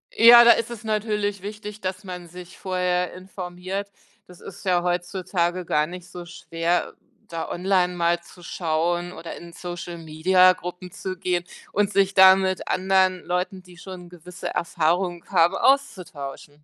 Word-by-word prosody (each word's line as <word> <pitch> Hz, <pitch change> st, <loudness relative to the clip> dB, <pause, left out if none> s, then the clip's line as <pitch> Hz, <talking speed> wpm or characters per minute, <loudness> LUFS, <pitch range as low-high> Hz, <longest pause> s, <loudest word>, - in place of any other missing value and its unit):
Ja, 235 Hz, +1 st, +9 dB
da 235 Hz, -, +8 dB
ist 230 Hz, -, +1 dB
es 235 Hz, -2 st, -8 dB
natürlich 210 Hz, -2 st, -1 dB
wichtig, 210 Hz, +1 st, -8 dB
dass 185 Hz, +1 st, -4 dB
man 180 Hz, -2 st, -8 dB
sich 180 Hz, +1 st, -12 dB
vorher 180 Hz, -1 st, -1 dB
informiert. 185 Hz, +1 st, -6 dB, 0.4 s
Das 180 Hz, -1 st, -16 dB
ist 185 Hz, -, -11 dB
ja 180 Hz, -2 st, +1 dB
heutzutage 175 Hz, 0 st, -1 dB
gar 150 Hz, -1 st, +1 dB
nicht 180 Hz, 0 st, -9 dB
so 180 Hz, -1 st, -9 dB
schwer, 170 Hz, 0 st, -2 dB, 0.3 s
da 165 Hz, -1 st, -5 dB
online 180 Hz, 0 st, +1 dB
mal 170 Hz, 0 st, +1 dB
zu 175 Hz, +1 st, -17 dB
schauen 175 Hz, +1 st, -1 dB
oder 165 Hz, -, -8 dB
in 170 Hz, 0 st, -12 dB
Social-Media-Gruppen 175 Hz, +1 st, 0 dB
zu 185 Hz, +1 st, -6 dB
gehen 180 Hz, -1 st, -1 dB, 0.3 s
und 205 Hz, 0 st, +1 dB
sich 195 Hz, -1 st, +2 dB
da 190 Hz, 0 st, +8 dB
mit 190 Hz, -1 st, -2 dB
anderen 185 Hz, -1 st, +1 dB
Leuten, 180 Hz, +1 st, -2 dB
die 180 Hz, -1 st, -17 dB
schon 180 Hz, 0 st, -10 dB
gewisse 180 Hz, +1 st, -8 dB
Erfahrungen 175 Hz, +1 st, -1 dB
haben, 175 Hz, 0 st, +4 dB
auszutauschen. 150 Hz, -, -1 dB
180 Hz, 150 wpm, -24 LUFS, 175-190 Hz, 0.4 s, Ja